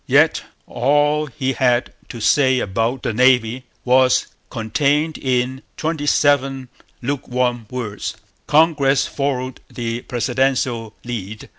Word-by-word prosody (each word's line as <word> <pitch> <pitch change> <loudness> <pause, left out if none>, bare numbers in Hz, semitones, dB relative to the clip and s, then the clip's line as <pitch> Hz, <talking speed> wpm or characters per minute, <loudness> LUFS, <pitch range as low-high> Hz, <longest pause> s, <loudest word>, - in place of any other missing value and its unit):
Yet - - +4 0.2
all 145 +4 +1
he 135 0 -2
had 125 -2 +1 0.2
to 120 - -7
say 130 +2 +3
about 115 +3 -1
the 115 - -1
Navy 125 0 +3 0.2
was 130 0 +4 0.2
contained 145 +7 0
in 130 0 -1 0.2
twenty 155 -2 -2
seven 135 -3 +2 0.3
lukewarm 125 -3 -1
words. 110 -5 -4 0.3
Congress 145 -3 +3
followed 130 -2 -3
the 115 0 -4
presidential 125 -2 -1
lead. 110 -3 -6
130 Hz, 110 wpm, -20 LUFS, 120-140 Hz, 0.3 s, Yet